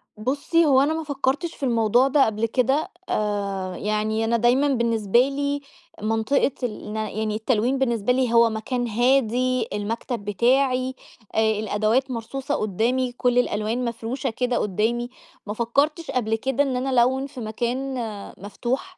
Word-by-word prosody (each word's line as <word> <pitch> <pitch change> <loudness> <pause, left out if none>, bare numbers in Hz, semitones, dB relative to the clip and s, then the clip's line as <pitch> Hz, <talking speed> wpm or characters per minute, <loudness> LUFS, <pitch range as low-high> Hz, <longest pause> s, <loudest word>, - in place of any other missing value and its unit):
بُصّي، 280 +9 +1
هو 270 -3 +5
أنا 290 +3 +2
ما 320 0 -3
فكّرتش 290 +3 -1
في - - -11
الموضوع 235 0 +3
ده 275 0 +4
قبل 220 0 -1
كده، 265 +6 +1 0.2
آآ 200 -3 -2
يعني 215 +1 -1
أنا 235 +1 +2
دايمًا 245 +5 +3
بالنسبة 235 -4 +2
لي 280 +2 0 0.4
منطقة 225 +6 +1
الن 215 -2 -4
يعني 215 0 -2
التلوين 230 +3 +1
بالنسبة 235 -3 +1
لي 250 -2 +1
هو 230 0 +6
مكان 240 +3 -2
هادي، 250 +1 +2
المكتب 220 +2 -3
بتاعي، 255 +5 +2 0.4
آآ - - +3 0.2
الأدوات 220 +5 +1
مرصوصة 270 +5 -3
قُدّامي، 235 +5 0
كل 245 0 0
الألوان 225 +1 -1
مفروشة 235 +3 -3
كده 245 +2 -1
قُدّامي، 225 +5 0 0.4
ما 205 - -2
فكّرتش 280 +8 0
قبل 225 -3 0
كده 265 +4 0
إن 270 -2 -2
أنا 255 +2 -1
ألوِّن 260 +2 +2
في 265 - -11
مكان 240 +5 -2 0.4
مفتوح، 245 - -4
240 Hz, 145 wpm, -24 LUFS, 220-265 Hz, 0.4 s, هو